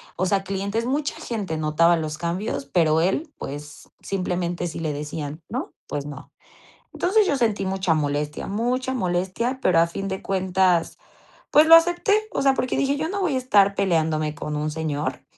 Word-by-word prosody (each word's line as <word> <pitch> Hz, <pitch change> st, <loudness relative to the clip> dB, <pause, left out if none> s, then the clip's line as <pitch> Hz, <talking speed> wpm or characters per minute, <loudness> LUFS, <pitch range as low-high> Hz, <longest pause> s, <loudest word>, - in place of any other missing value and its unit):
o 185 Hz, -, 0 dB
sea, 195 Hz, +1 st, +1 dB
clientes 200 Hz, +4 st, -2 dB
mucha 290 Hz, +3 st, -1 dB
gente 200 Hz, -9 st, -4 dB
notaba 155 Hz, +3 st, +3 dB
los 155 Hz, -1 st, -3 dB
cambios, 170 Hz, -4 st, -3 dB
pero 160 Hz, +1 st, +2 dB
él, 290 Hz, -, 0 dB
pues, 145 Hz, +1 st, -8 dB
simplemente, 175 Hz, -2 st, -2 dB
si 165 Hz, -, -5 dB
le 155 Hz, -3 st, -2 dB
decían, 150 Hz, +1 st, -6 dB
¿no? 260 Hz, -, -5 dB
Pues 145 Hz, 0 st, -4 dB
no. 145 Hz, 0 st, -10 dB, 0.6 s
Entonces, 400 Hz, +3 st, +2 dB
yo 285 Hz, -, +1 dB
sentí 220 Hz, -6 st, 0 dB
mucha 190 Hz, -3 st, +1 dB
molestia 145 Hz, 0 st, -2 dB
mucha 250 Hz, +5 st, -1 dB
molestia, 190 Hz, +5 st, -1 dB
pero 170 Hz, -3 st, +4 dB
a 170 Hz, -, +3 dB
fin 195 Hz, +3 st, -5 dB
de 190 Hz, 0 st, -4 dB
cuentas, 185 Hz, -2 st, +1 dB, 0.6 s
pues, 305 Hz, +1 st, +6 dB
lo 330 Hz, -, +10 dB
acepté, 350 Hz, +5 st, +4 dB, 0.2 s
o -, -, 0 dB
sea, 270 Hz, -1 st, +4 dB
porque 255 Hz, -, -1 dB
dije: 280 Hz, +1 st, +1 dB
"Yo 315 Hz, +3 st, -2 dB
no 400 Hz, 0 st, -2 dB
voy 325 Hz, -8 st, +1 dB
a -, -, +2 dB
estar 200 Hz, -6 st, +3 dB
peleándome 160 Hz, -5 st, +1 dB
con 150 Hz, -1 st, -4 dB
un 150 Hz, +1 st, -2 dB
señor, 150 Hz, -2 st, -3 dB
185 Hz, 180 wpm, -23 LUFS, 155-245 Hz, 0.6 s, lo